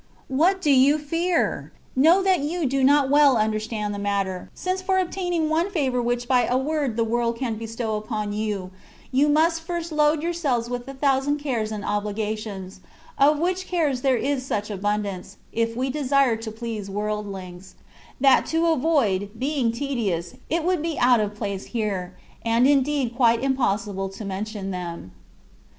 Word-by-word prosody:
What 345 +8 +2
do 295 - +3
you 275 +3 +5
fear? 330 +4 -1 0.2
Know 330 +9 +5
that 380 -2 +3
you 315 +3 -2
do 270 0 +1
not 280 0 +4
well 285 -3 +6
understand 215 -1 -1
the 205 - -5
matter, 200 -2 -2
since 370 +1 -2
for 375 0 +1
obtaining 355 -3 0
one 325 +4 +1
favour 270 -10 0
which 240 0 -1
by 250 -1 +3
a 250 - +2
word 280 -3 -1
the 230 - +3
world 235 +1 0
can 240 -2 -2
bestow 225 0 -4
upon 210 -1 -3
you, 205 -3 -3 0.4
you 275 +3 +3
must 325 +2 +3
first 340 0 -4
load 300 0 +2
yourselves 280 -9 -1
with 245 +1 -4
a 275 - -7
thousand 275 +1 +1
cares 245 -7 -2
and 210 -1 -4
obli 205 0 -2
gations, 210 -3 -4 0.4
of 290 +2 +5
which 365 +3 -1
cares 300 -8 0
there 265 -2 +3
is 275 +1 -1
such 210 -4 -3
abundance 200 -1 -3 0.2
^ 230 0 0
we 260 +2 -1
desire 275 -3 +2
to 220 0 -6
please 220 -2 -5
worldlings), 195 -3 -5 0.4
that 270 -1 +5
to 325 +1 +1
avoid 270 - +2
being 265 -2 0
tedious, 230 -10 -2 0.2
it 335 0 0
would 360 -2 +1
be 325 -1 -2
out 245 -1 +5
of 210 -1 -2
place 200 -2 -4
here, 195 -4 -3 0.3
and 230 +2 +3
indeed 275 -3 +1
quite 235 -1 +3
impossible 205 -7 0
to 195 +2 -8
mention 195 0 -4
them. 170 - -6
245 Hz, 170 wpm, -24 LUFS, 210-295 Hz, 0.4 s, well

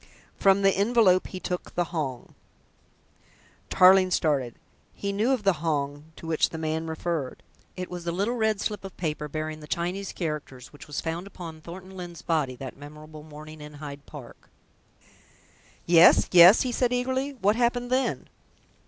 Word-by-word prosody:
From 195 0 +3
the 195 - +5
envelope 200 -3 +3
he 185 - -7
took 180 -1 -5
the 175 - +2
Hong." 135 -7 -4 1.4
Tarling 185 0 +6
started. 140 -9 0 0.4
He 200 0 -3
knew 220 +6 +1
of 255 -5 0
the 195 -1 +4
Hong 145 -2 -2
to - - -12
which 160 -1 +1
the 160 - -7
man 160 0 -2
referred. 160 -4 -4 0.3
It 180 0 -4
was 175 -1 -7
the 170 - -2
little 200 +7 -1
red 220 -3 0
slip 205 -2 -3
of 195 - -10
paper 150 -3 -3
bearing 155 +1 -5
the 150 - -11
Chinese 180 +5 -3
characters 150 -7 -6
which 145 - -13
was 150 - -4
found 165 +3 -4
upon 165 -5 -9
Thornton 185 +3 -10
Lyne's 175 -3 -8
body 150 -6 0
that 130 +1 -8
memorable 150 +2 -11
morning 155 0 -11
in 150 0 -10
Hyde 145 -1 -9
Park. 140 -6 -12 1.4
"Yes, 170 0 +6
yes," 180 +3 +8
he 255 - -2
said 245 0 0
eagerly. 260 +3 -1
"What 205 +1 +2
happened 245 +1 0
then?" 260 +1 0
170 Hz, 165 wpm, -26 LUFS, 150-195 Hz, 1.4 s, yes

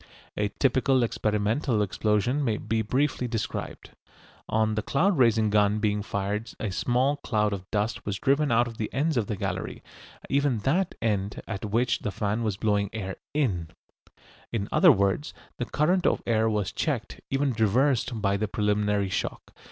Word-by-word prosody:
A 105 - 0
typical 130 -1 +3
experimental 110 +2 0
explosion 105 +7 0
may 110 -5 0
be 110 +1 -1
briefly 125 +3 0
described. 115 -2 -4 0.6
On 110 0 +2
the 110 - -1
cloud 175 - +2
raising 110 -3 +4
gun 105 0 +3
being 105 -1 0
fired 100 +3 -3
a 105 - -2
small 125 +8 +1
cloud 105 -6 0
of 95 -2 -7
dust 105 +1 -1
was 100 -1 -3
driven 140 +3 +2
out 120 +1 +4
of 115 -1 -9
the 110 - -3
ends 155 +3 0
of 115 -5 0
the 105 - -2
gallery, - - -4 0.4
even 140 -3 +1
that 170 - +1
end 100 -2 -1
at 105 -2 -4
which 115 +4 +1
the - - -3
fan 105 +3 -1
was 105 -4 -1
blowing 105 -2 +1
air 95 -4 -4 0.2
in. 100 - 0 0.8
In 100 -4 -2
other - - +7
words, 100 +9 0 0.2
the 120 - -1
current 175 +8 +1
of - - +1
air 110 -1 +2
was 105 -3 -1
checked, - - -3
even 135 0 +1
reversed, 120 +2 +1
by 100 0 +2
the 110 +2 -1
preliminary 105 -1 0
shock. - - -4
110 Hz, 165 wpm, -27 LUFS, 105-125 Hz, 0.8 s, other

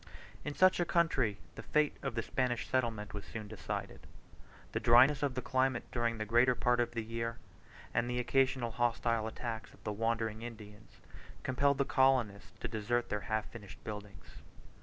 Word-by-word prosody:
In 145 - -4
such 185 0 +5
a - - +4
country 150 -12 +2 0.2
the - - -8
fate 150 -1 +1
of 135 -4 -3
the 115 - -1
Spanish 125 -2 -1
settlement 115 -5 -1
was 105 -1 -5
soon 110 -2 -7
decided; 105 -2 -6 0.6
the - - -1
dryness 125 +5 +6
of 140 -3 0
the 130 - -3
climate 130 -2 +1
during 115 -1 0
the 110 - -3
greater 120 +3 +4
part 125 0 +2
of 120 - 0
the 115 - -1
year, 115 +1 -3 0.6
and 120 +1 +1
the 125 - -1
occasional 130 -1 +1
hostile 115 -1 +1
attacks 110 0 -5
of - - -24
the 105 - -2
wandering 115 0 -1
Indians, 110 -2 -10 0.4
compelled 140 +2 +2
the 140 - +2
colonists 130 -8 +2
to - - -2
desert 115 +2 -1
their 105 0 -1
half 110 -1 -1
finished 100 -5 -11
buildings. 105 -3 -9
115 Hz, 175 wpm, -33 LUFS, 110-130 Hz, 0.6 s, dryness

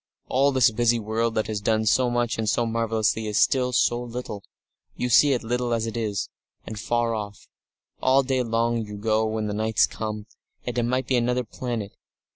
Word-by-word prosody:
All 135 +2 +3
this 130 -4 +4
busy 120 +1 +2
world 110 +1 -1
that 110 - +1
has 105 -2 -3
done 110 +1 +1
so 125 +3 +3
much 120 -1 -1
and 110 -1 0
so 120 - +1
marvellously, 110 -2 0
and - - -2
is 105 - -1
still 125 +4 +3
so 120 0 +2
little 120 -4 -6 0.5
you 125 - -2
see 140 +4 +6
it 125 - -2
little 120 +1 -1
as 115 -1 -2
it 115 - -5
is 105 -4 -2 0.4
and 110 -1 -7
far 120 +1 0
off. 105 -2 -6 0.5
All 135 +1 +4
day 130 -1 0
long 115 0 0
you 105 -1 -8
go 110 +1 0
and 110 -1 -2
the 105 - -3
night 110 +1 -2
comes, 105 -1 -5 0.4
and 125 - -3
it 120 - +1
might 130 +2 0
be 130 - +1
another 125 +1 +1
planet. 115 -3 -5
115 Hz, 205 wpm, -25 LUFS, 110-125 Hz, 0.5 s, see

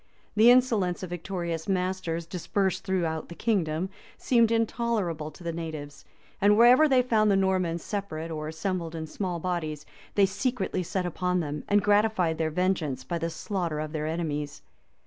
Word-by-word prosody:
The 220 +3 +7
insolence 225 -8 +3
of 180 - -6
victorious 170 -2 -4
masters, 185 -3 -1
dispersed 185 +2 -1
throughout 170 -5 -1
the 170 - -8
kingdom, 185 -3 0 0.3
seemed 235 -3 +3
intolerable 225 -9 0
to 155 +4 -14
the 170 - -2
natives; 155 -3 -7 0.4
and 205 +1 +5
wherever 250 +6 +7
they 255 -2 +4
found 220 -4 +3
the 200 - +4
Normans 185 -3 +1
separate 165 -6 -4
or 155 -1 -4
assembled 165 +1 -3
in 160 -1 -4
small 175 +2 -3
bodies, 155 -4 -3 0.3
they 200 - +6
secretly 195 -2 -1
set 180 +1 -2
upon 180 +1 0
them, 150 -3 -3
and 205 0 +3
gratified 205 -6 +2
their 160 -1 +1
vengeance 155 -6 -1
by 170 +5 -3
the 165 +1 -1
slaughter 170 -3 -3
of 155 0 -4
their 155 -1 -2
enemies. 150 -3 -3
180 Hz, 165 wpm, -27 LUFS, 160-200 Hz, 0.4 s, The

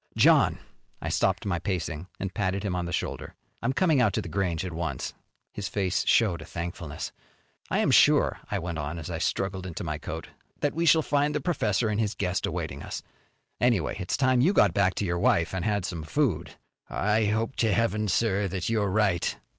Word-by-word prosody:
"John." - - +5 0.4
I - - -4
stopped 95 +3 +1
my 90 -4 0
pacing 85 -3 -3
and 95 -1 -3
patted 95 0 -1
him 95 -3 -1
on 90 -1 -1
the 85 - -4
shoulder. - - -3 0.3
"I'm 115 - +1
coming 155 -2 +3
out 110 -6 +3
to - - 0
The - - -7
Grange 90 0 -1
at 90 - -5
once." 80 -6 -3 0.4
His 100 -2 -4
face 95 -2 0
showed 100 -8 +3
his 80 - -11
thankfulness. 85 -3 -5 0.6
"I - - +1
am - - +2
sure," - - +5
I 105 - 0
went 85 -3 -4
on 75 +3 -4
as 80 - -6
I - - -3
struggled 95 -1 -1
into 85 - -5
my 75 -3 -3
coat, - - -6 0.3
"that 145 - +1
we 170 +1 0
shall 160 0 +6
find 145 +1 +1
the - - +1
professor 120 - 0
and 105 0 0
his 110 -2 0
guest 90 -2 -1
awaiting - - -4
us. - - -6 0.6
Anyway, 115 -10 +2
it's 90 - -1
time 130 -2 +3
you 175 +10 +4
got 100 - +4
back 95 -1 +2
to 105 - -1
your 85 -1 -1
wife 85 0 +2
and 95 -2 -2
had 100 -2 0
some 85 -4 -4
food." 85 - -1 0.3
"I 105 +2 +1
hope 110 +4 0
to 110 -2 +2
Heaven, 110 -1 +1
sir, 100 0 +1
that 95 +1 -3
you're 105 -3 +1
right." 95 -4 +1
95 Hz, 210 wpm, -27 LUFS, 85-110 Hz, 0.6 s, shall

